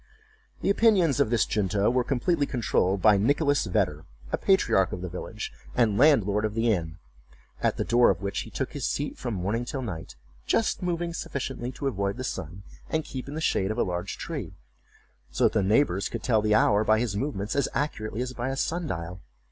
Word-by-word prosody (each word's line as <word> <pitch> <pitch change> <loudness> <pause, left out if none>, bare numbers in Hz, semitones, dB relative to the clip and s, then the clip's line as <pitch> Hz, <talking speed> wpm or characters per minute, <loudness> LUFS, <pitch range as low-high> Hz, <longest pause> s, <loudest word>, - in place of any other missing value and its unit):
The - - +3
opinions 195 - +3
of - - +3
this 120 -1 +2
junto 100 -1 0
were 125 0 +2
completely 140 +4 0
controlled 100 -6 0
by 105 -2 +6
Nicholas 145 +4 +2
Vedder, 90 -6 0 0.3
a - - +1
patriarch 95 - +3
of 90 - -5
the 90 - -4
village, 105 +5 -6 0.2
and 115 -4 +3
landlord 110 -7 +4
of 110 -1 -2
the 115 0 +2
inn, 80 -3 -4 0.6
at - - +1
the - - 0
door 120 +1 +4
of - - +1
which 100 +1 -3
he - - -6
took - - -4
his - - -2
seat - - -2
from 120 -4 -3
morning 100 +6 -1
till 130 +2 -4
night, 85 - -6 0.3
just 225 - +1
moving 175 -1 -2
sufficiently 130 -5 -4
to 140 - -6
avoid 100 -5 -1
the 130 - -4
sun 95 - -5 0.3
and 160 0 0
keep 130 -1 -6
in 145 - -6
the 160 - -3
shade 95 -10 +1
of 110 - -2
a - - +3
large 90 +1 -3
tree; - - -5 0.7
so 65 - -1
that - - +4
the 110 - +2
neighbors 100 -1 +2
could - - -5
tell 110 -4 +3
the 105 0 +2
hour 105 0 +4
by 110 0 +4
his 115 -4 -1
movements 105 -3 -2
as 140 -2 +1
accurately 120 -5 -2
as 125 0 -5
by 125 +1 -3
a 135 - -3
sundial. 95 - -3
110 Hz, 205 wpm, -27 LUFS, 100-135 Hz, 0.7 s, by